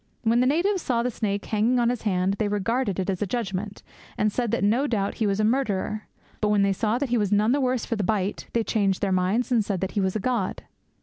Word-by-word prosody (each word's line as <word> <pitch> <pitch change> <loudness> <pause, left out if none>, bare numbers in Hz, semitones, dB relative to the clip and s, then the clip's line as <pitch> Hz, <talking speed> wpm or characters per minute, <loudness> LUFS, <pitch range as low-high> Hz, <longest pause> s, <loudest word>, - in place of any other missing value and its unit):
When 230 +1 +3
the 250 - +3
natives 360 +7 +1
saw 235 -5 0
the 250 - -1
snake 205 -2 -2
hanging 225 +4 +1
on 235 -1 +3
his 245 -2 -2
hand, 190 -1 0
they 215 - +1
regarded 205 0 -1
it 185 - -1
as 190 -3 -2
a 205 - 0
judgement, 200 -2 -4 0.3
and 210 0 +2
said 240 +1 -1
that 195 - 0
no 235 +8 +2
doubt 205 -6 -1
he 215 - +3
was 200 0 0
a - - +2
murderer. 215 -3 0 0.3
But 215 - +1
when 205 -1 +3
they 200 0 +2
saw 215 +4 0
that 275 0 -2
he 240 -1 +2
was 205 -2 0
none 210 +2 +3
the 280 +2 +2
worse 255 -2 0
for 230 - -2
the 210 - -2
bite, 200 0 -1
'they 230 - +1
changed 200 -4 0
their 195 - +1
minds, 190 +7 +1
and 230 -3 +3
said 200 -2 -2
that 190 - -2
he 205 - 0
was 190 +1 0
a - - 0
god!' 230 -3 -1
215 Hz, 265 wpm, -25 LUFS, 200-240 Hz, 0.3 s, When